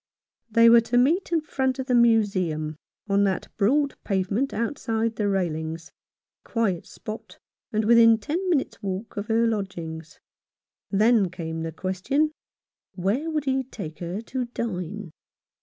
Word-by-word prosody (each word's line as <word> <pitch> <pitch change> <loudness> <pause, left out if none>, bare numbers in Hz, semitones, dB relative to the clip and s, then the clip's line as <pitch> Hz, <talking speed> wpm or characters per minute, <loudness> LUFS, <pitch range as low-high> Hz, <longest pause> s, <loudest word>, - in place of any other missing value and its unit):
They 230 +1 +6
were 230 0 +8
to 235 +2 0
meet 320 +10 +2
in 330 -2 +2
front 265 -3 -1
of 265 - -3
the 255 - 0
Museum 195 -10 +2 0.2
— - - -54
on 200 0 +3
that 190 -2 -1
broad 275 +7 +2
pavement 200 +6 0
outside 230 -1 -1
the 210 -1 0
railings 165 -4 -2 0.3
— - - -69
a - - -22
quiet 215 -8 0
spot, 215 +1 -9 0.3
and 215 0 0
within 230 0 +7
ten 330 - -2
minutes' 305 -7 0
walk 195 +2 -4
of 205 +1 -4
her 230 +1 +3
lodgings. 170 -7 -4 0.7
Then 215 -1 +3
came 165 -2 -5
the 165 0 -3
question, 190 - 0 0.6
Where 205 - 0
would 305 -3 -1
he 265 0 +1
take 195 -11 -8
her 180 +4 -4
to 250 +2 -3
dine 205 -6 -5
220 Hz, 155 wpm, -25 LUFS, 185-245 Hz, 0.7 s, were